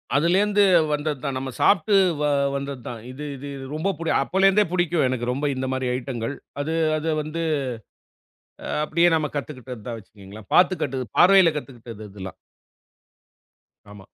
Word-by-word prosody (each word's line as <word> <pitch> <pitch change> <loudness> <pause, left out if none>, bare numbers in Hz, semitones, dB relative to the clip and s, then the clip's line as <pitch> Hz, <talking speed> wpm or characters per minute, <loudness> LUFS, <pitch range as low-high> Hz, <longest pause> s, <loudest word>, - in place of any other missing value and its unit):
அதுலேருந்து 195 +7 +3 0.3
வந்தது 150 -1 -2
தான். 135 -2 -2
நம்ம 130 0 -4
சாப்ட்டு 200 +1 +4 0.3
வ - - +1 0.3
வந்தது 140 -2 -5
தான். 115 -2 -7
இது 145 +4 -7
இது 140 +2 -8 0.3
ரொம்ப 195 +6 -1
புடி 165 -1 -1
அப்போலேருந்தே 195 +5 +3
புடிக்கும், 175 -4 +1
எனக்கு 125 -2 -2
ரொம்ப 140 +3 -3
இந்த 130 0 -3
மாதிரி 130 -1 -1
ஐட்டங்கள். 125 0 -4 0.3
அது 155 +3 -2 0.2
அது 155 +1 -2
வந்து, 155 +2 -4 1.4
அப்படியே 170 +3 +3
நம்ம 155 -2 -1
கத்துக்கிட்டது 130 -6 -6
தான் 115 -1 -4
வச்சிக்கிங்களேன். 100 0 -14
பாத்து 185 +1 +5
கட்டு 130 -2 -2
பார்வையில 185 -2 +7
கத்துகிட்டது 120 -6 -8
இதெல்லாம். 95 -1 -8 1.5
ஆமா. 100 -2 -13
140 Hz, 140 wpm, -23 LUFS, 125-170 Hz, 1.5 s, பார்வையில